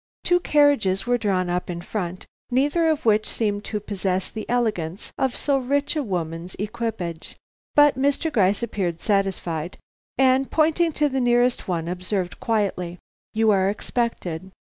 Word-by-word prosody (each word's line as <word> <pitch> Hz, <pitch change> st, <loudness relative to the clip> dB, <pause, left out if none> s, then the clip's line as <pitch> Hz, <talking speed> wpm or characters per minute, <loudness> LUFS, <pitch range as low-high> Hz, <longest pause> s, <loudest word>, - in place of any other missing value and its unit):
Two 355 Hz, 0 st, +3 dB
carriages 285 Hz, -, +3 dB
were 245 Hz, 0 st, +1 dB
drawn 190 Hz, -4 st, +1 dB
up 180 Hz, +1 st, -2 dB
in 170 Hz, -1 st, -3 dB
front, 180 Hz, 0 st, -4 dB, 0.2 s
neither 290 Hz, +6 st, +2 dB
of 310 Hz, -5 st, 0 dB
which 215 Hz, -1 st, +3 dB
seemed 205 Hz, -2 st, -1 dB
to 210 Hz, -, -2 dB
possess 190 Hz, -2 st, -2 dB
the 220 Hz, -, -7 dB
elegance 210 Hz, -7 st, -1 dB
of 265 Hz, -2 st, +1 dB
so 280 Hz, -2 st, +1 dB
rich 280 Hz, +4 st, 0 dB
a 305 Hz, -, +1 dB
woman's 175 Hz, -, -4 dB
equipage. 210 Hz, -6 st, -4 dB, 0.4 s
But 290 Hz, -3 st, +6 dB
Mr. 285 Hz, +3 st, +1 dB
Gryce 200 Hz, +1 st, +3 dB
appeared 185 Hz, -7 st, -2 dB
satisfied, 185 Hz, -5 st, -1 dB, 0.4 s
and 265 Hz, +1 st, +3 dB
pointing 325 Hz, +2 st, +2 dB
to 295 Hz, 0 st, +2 dB
the 265 Hz, -2 st, -1 dB
nearest 245 Hz, -1 st, +2 dB
one, 170 Hz, -3 st, -1 dB
observed 180 Hz, +1 st, -3 dB
quietly: 190 Hz, -6 st, -1 dB, 0.4 s
"You 220 Hz, 0 st, +4 dB
are 190 Hz, -1 st, +3 dB
expected. 200 Hz, -5 st, -3 dB
210 Hz, 150 wpm, -23 LUFS, 185-260 Hz, 0.4 s, But